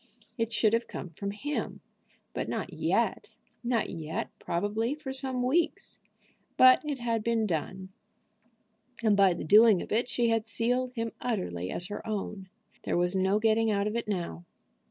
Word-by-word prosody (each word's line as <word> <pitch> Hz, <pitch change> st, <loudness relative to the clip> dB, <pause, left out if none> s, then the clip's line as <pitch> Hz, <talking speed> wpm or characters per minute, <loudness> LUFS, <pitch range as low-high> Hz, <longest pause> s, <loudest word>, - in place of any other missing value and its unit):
It 230 Hz, -2 st, -2 dB
should 220 Hz, -1 st, +2 dB
have 230 Hz, +1 st, +1 dB
come 180 Hz, -, -7 dB
from 200 Hz, +5 st, -5 dB
him, 280 Hz, +9 st, -4 dB, 0.5 s
but -, -, -3 dB
not -, -, -4 dB
yet; -, -, 0 dB, 0.3 s
not 235 Hz, -2 st, 0 dB
yet, 160 Hz, -2 st, -4 dB
probably, 210 Hz, +9 st, -1 dB
for 295 Hz, -3 st, -6 dB
some 260 Hz, -2 st, 0 dB
weeks. 315 Hz, +7 st, 0 dB, 0.6 s
But 255 Hz, 0 st, +7 dB
it 295 Hz, -2 st, -3 dB
had 230 Hz, -3 st, -1 dB
been 230 Hz, -1 st, +1 dB
done, 190 Hz, +1 st, -3 dB, 1.1 s
and 215 Hz, -2 st, +4 dB
by 195 Hz, -3 st, +5 dB
the -, -, -5 dB
doing 210 Hz, +3 st, +6 dB
of -, -, -7 dB
it 235 Hz, +3 st, +1 dB
she 240 Hz, -1 st, +1 dB
had 225 Hz, -1 st, 0 dB
sealed 245 Hz, +3 st, 0 dB
him 230 Hz, -1 st, -2 dB
utterly 90 Hz, -, -2 dB
as 175 Hz, -, -3 dB
her 205 Hz, +2 st, -6 dB
own. 205 Hz, -2 st, -4 dB, 0.3 s
There -, -, -1 dB
was 175 Hz, +2 st, +1 dB
no 190 Hz, +2 st, +2 dB
getting 220 Hz, +1 st, +2 dB
out 200 Hz, -1 st, +1 dB
of 210 Hz, +1 st, -2 dB
it 235 Hz, -, -2 dB
now. 175 Hz, -4 st, -3 dB
220 Hz, 170 wpm, -29 LUFS, 195-240 Hz, 1.1 s, But